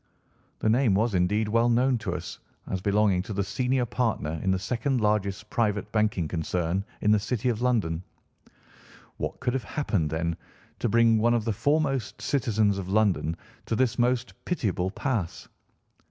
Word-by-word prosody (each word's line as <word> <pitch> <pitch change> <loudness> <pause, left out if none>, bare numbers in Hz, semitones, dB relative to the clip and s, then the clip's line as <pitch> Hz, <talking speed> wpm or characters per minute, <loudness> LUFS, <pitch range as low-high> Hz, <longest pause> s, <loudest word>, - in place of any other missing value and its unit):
The - - -1
name 115 -2 +3
was 110 +2 +1
indeed 100 +4 +2
well 115 +3 +3
known 125 +1 +3
to 95 -5 -3
us - - -6 0.3
as 95 - -3
belonging 100 -2 +2
to 105 +3 -6
the 100 0 0
senior 125 +6 0
partner 110 -10 -1
in 95 - 0
the 95 - +3
second 120 +6 -1
largest 105 -1 0
private 105 -2 0
banking 105 -6 +1
concern 85 +3 -1 0.2
in 105 - +3
the 105 - +5
City 120 +3 -1
of 115 -1 -1
London. 105 -10 +1 1.2
What - - -4
could 125 - -1
have 130 -3 -1
happened, 100 - -1
then, 85 +1 -2 0.4
to 120 - 0
bring 115 0 +4
one 120 +2 +3
of 115 -2 -1
the 115 - 0
foremost 135 -1 0
citizens 110 -7 +1
of 95 -1 -5
London 95 -6 +1 0.3
to 115 - 0
this 120 0 +1
most 125 +1 +1
pitiable 100 - -1
pass? 105 -4 -3
105 Hz, 170 wpm, -27 LUFS, 95-120 Hz, 1.2 s, the